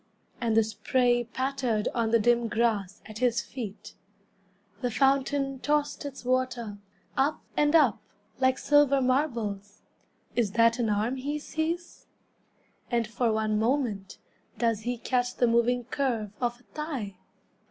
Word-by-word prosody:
And 225 -2 +1
the 225 - +6
spray 240 +3 +1
pattered 255 -3 -1
On 230 -2 0
the 230 - +5
dim 235 +1 +2
grass 220 -4 0
at 215 0 -9
his 240 -2 +2
feet. 230 -5 -7 0.9
The 245 - 0
fountain 275 +1 +1
tossed 295 +1 0
its 275 -3 -7
water, 245 -5 -1 0.4
Up 280 +3 +1
and 295 +2 +3
up, 280 -10 +5 0.4
like 260 0 +3
silver 290 -1 +4
marbles. 235 -7 -1 0.5
Is 220 -5 +1
that 230 +1 +4
an 230 -2 +1
arm 215 +5 0
he 285 +3 -2
sees? 320 +3 -4 0.8
And 235 -2 +1
for 230 +1 0
one 215 -1 0
moment 225 -5 -1 0.4
Does 230 -3 +1
he 245 +2 -3
catch 245 +1 -1
the 245 - +3
moving 235 +1 +2
curve 235 -5 -2
Of 240 0 -1
a - - -24
thigh? 270 - -4
240 Hz, 140 wpm, -28 LUFS, 225-270 Hz, 0.9 s, the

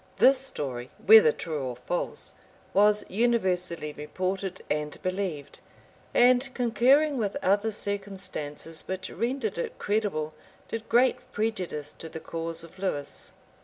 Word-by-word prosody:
This 265 0 +6
story, 130 - -2 0.2
whether 215 -6 +9
true 155 -1 -4
or 130 -2 -3
false, 125 +9 -3 0.4
was 210 +1 +4
universally 185 -8 0
reported 185 +5 -3
and 150 0 -2
believed; 185 -7 -3 0.5
and, 250 +2 +4
concurring 260 +4 +4
with 205 +2 -1
other 205 +3 +3
circumstances, 195 -7 -4
which 190 0 -4
rendered 235 -6 -2
it - - -4
credible, 200 -8 -1 0.3
did 225 -1 -5
great 255 +1 +3
prejudice 185 - -2
to 160 - -9
the 160 - -7
cause 165 0 -4
of 170 +3 -14
Lewis. 145 -7 -3
190 Hz, 125 wpm, -28 LUFS, 155-225 Hz, 0.5 s, whether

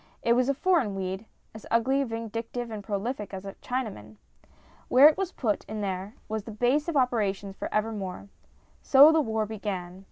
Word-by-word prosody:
It 235 - +4
was 250 +2 +2
a 275 - +2
foreign 285 - +1
weed 190 +2 -4 0.3
as 220 - -11
ugly,, 265 +4 +2
vindictive, 230 0 -5
and 210 -2 -6
prolific 205 +1 -3
as 190 +1 -8
a 195 - -6
Chinaman! 210 - -4 0.7
Where 265 +4 +8
it 305 - +4
was 385 -2 -2
put 220 - -1
in 215 0 -5
there 195 +1 -4
was 215 0 -4
its 220 -2 -8
base 265 +7 +2
of 335 -4 0
operations 205 -6 0
for - - -5
evermore. 210 -3 -3 0.5
So 285 +3 +8
the 320 -1 +3
war 220 -5 -1
began. 190 -4 -5
220 Hz, 180 wpm, -27 LUFS, 200-255 Hz, 0.7 s, Where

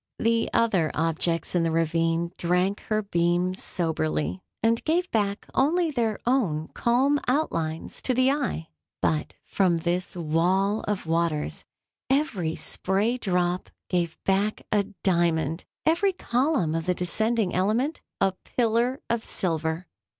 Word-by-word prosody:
The 230 0 +1
other 200 -9 +2
objects 165 +1 0
in 175 - +3
the 165 - +1
ravine 165 +1 +1
drank 180 +3 +1
her 215 0 +1
beams 175 0 +1
soberly, 85 - -1 0.2
and 230 +1 +2
gave 350 +3 +1
back 205 -2 0
only 325 +4 +2
their 230 -6 0
own 195 - +1
calm 270 +5 +2
outlines 165 - -1
to 255 - 0
the 255 +2 +4
eye; 245 - -2 0.3
but, 155 -1 0
from 185 -4 +2
this 175 +3 -2
wall 180 +5 +1
of 205 -4 -1
waters, 165 -2 -1 0.4
every 225 - +1
spray 210 +6 0
drop 180 -3 0 0.2
gave 170 -3 0
back 200 +2 +1
a 205 -2 +3 0.2
diamond—every 175 - +1
column 250 - +1
of 165 +1 -2
the 180 - +2
descending 215 +3 0
element, 220 - +1 0.2
a 195 0 +3 0.2
pillar 240 +3 +2
of 230 -1 -1
silver. 160 -1 -1
185 Hz, 130 wpm, -26 LUFS, 165-235 Hz, 0.4 s, the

